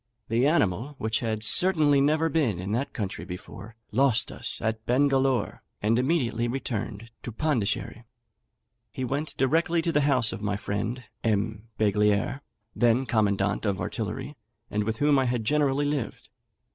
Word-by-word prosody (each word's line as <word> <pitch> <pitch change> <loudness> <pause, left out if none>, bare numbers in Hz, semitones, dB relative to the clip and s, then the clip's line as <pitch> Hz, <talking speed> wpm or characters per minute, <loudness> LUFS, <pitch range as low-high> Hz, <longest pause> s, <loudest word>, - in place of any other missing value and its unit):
The 120 +4 +3
animal, 130 - +1
which 110 0 -1
had 110 -2 -2
certainly 150 - +4
never 155 +3 +2
been 145 - +1
in 95 +3 -4
that 125 +6 -1
country 100 -6 -4
before, 100 +4 -9 0.2
lost 120 0 +2
us - - 0
at 110 0 -2
Bengalore, 135 0 +2 0.2
and 115 +3 +2
immediately 125 -5 0
returned 115 -3 -4
to 120 - -6
Pondicherry. 120 -3 -1 0.9
He 130 - -4
went 145 +5 -3
directly 165 +5 +2
to 170 - 0
the 150 - +2
house 130 -6 +2
of 110 - -6
my 105 -1 -1
friend, 105 +5 -3 0.2
M. 110 0 -1
Beglier, 105 +4 +1 0.3
then 120 +2 +3
commandant 100 -4 +1
of 100 -4 -1
artillery, 110 +6 -4 0.4
and 105 0 0
with 110 0 -2
whom 145 0 +3
I 130 - +2
had 120 -2 -1
generally 145 +2 +2
lived. 145 -5 -3
120 Hz, 150 wpm, -26 LUFS, 105-140 Hz, 0.9 s, certainly